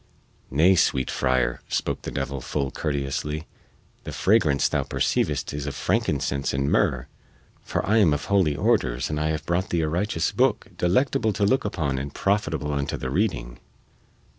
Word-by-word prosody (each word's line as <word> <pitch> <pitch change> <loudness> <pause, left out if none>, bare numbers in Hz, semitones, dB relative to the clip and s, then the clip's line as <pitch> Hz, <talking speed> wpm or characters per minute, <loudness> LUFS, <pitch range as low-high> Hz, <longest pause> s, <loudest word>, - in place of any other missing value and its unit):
"Nay, 80 +8 +5
sweet 65 -7 +2
friar," - - 0
spake - - -1
the - - -5
devil 70 -1 -3
full 70 +1 -2
courteously, 75 +1 -3 0.6
"the - - -6
fragrance 90 -9 +3
thou - - 0
perceivest - - -1
is 75 -1 -4
of 70 - -4
frankincense 70 -1 0
and 70 +1 0
myrrh, 60 -1 +2 0.6
for - - -2
I 110 +3 +3
am 95 -7 +5
of 75 0 -1
holy 95 -7 +2
orders 65 -1 +1
and 75 - -1
I 75 - 0
have 80 0 -2
brought 85 +2 0
thee 85 - +1
a 80 - 0
righteous 85 0 0
booke, - - +1
delectable 110 +4 +1
to 100 - +1
look 130 +5 +2
upon 70 -9 -1
and 70 +1 -5
profitable 80 -7 0
unto 70 -1 -2
the 65 - -4
reading." - - -1
75 Hz, 165 wpm, -25 LUFS, 70-90 Hz, 0.6 s, Nay